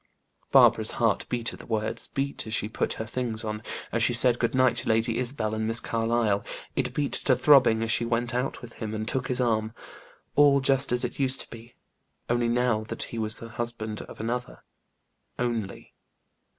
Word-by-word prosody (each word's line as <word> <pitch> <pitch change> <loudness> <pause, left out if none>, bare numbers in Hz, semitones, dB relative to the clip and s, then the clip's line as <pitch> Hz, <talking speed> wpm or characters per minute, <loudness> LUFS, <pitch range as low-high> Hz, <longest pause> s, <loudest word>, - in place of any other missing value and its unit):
Barbara's - - +6
heart - - +1
beat 120 -2 -2
at - - -11
the - - -12
words; 110 -1 -2
beat 140 -3 -3
as 110 - -1
she 105 - 0
put 110 - -2
her 110 - -5
things 115 -1 -3
on 105 -1 -4 0.3
as 115 - 0
she 120 - +3
said 120 0 +4
good 115 +1 0
night 130 -2 +3
to 120 - -3
Lady 115 +1 +1
Isabel 120 -4 -2
and 110 0 -1
Miss 115 +1 +1
Carlyle; 115 -3 0 0.3
it - - -1
beat 145 -1 0
to 130 - +3
throbbing 125 -4 +5
as 115 - 0
she 120 - +3
went 120 +1 -1
out 125 +1 -2
with 115 - -10
him, 110 -1 -3
and 110 0 -4
took 130 +1 -1
his 125 - -1
arm. 110 -2 0 0.6
All 145 -1 +6
just 135 0 +2
as 125 +1 +2
it 125 - -6
used 135 -1 +2
to - - -11
be 115 +1 -12 0.6
only 120 0 +2
now 120 -2 +1
that - - -4
he 115 - -3
was 110 0 +1
the 115 - -8
husband 115 -2 -4
of - - -11
another. 120 +2 -4 0.7
Only! 115 -5 -3
120 Hz, 200 wpm, -27 LUFS, 110-125 Hz, 0.7 s, Barbara's